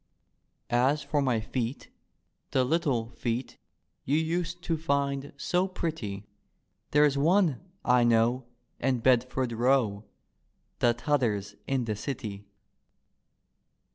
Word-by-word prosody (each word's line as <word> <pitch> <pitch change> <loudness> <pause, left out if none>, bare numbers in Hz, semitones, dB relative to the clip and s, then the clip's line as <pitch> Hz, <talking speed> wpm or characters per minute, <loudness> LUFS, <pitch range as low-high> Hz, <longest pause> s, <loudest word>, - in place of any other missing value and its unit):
As 130 +5 +2
for 145 -2 0
my 130 -5 +1
feet, 120 +3 -4 0.6
the 130 - +2
little 130 -6 0
feet 120 +1 -3 0.4
You 145 +3 +1
used 170 +2 -2
to 165 - 0
find 140 -2 -1
so 180 +6 +1
pretty. 135 - -4 0.6
There's 150 -1 +4
one, 165 -2 +3 0.2
I 125 -1 +5
know, 120 +2 +2 0.3
in 130 -2 0
Bedford 125 +1 +2
Row, 115 -3 +1 0.7
The 120 -1 +3
T'other's 115 -6 0
in 135 -3 0
the 110 -2 -2
City. 105 -4 -5
130 Hz, 110 wpm, -28 LUFS, 115-150 Hz, 0.7 s, I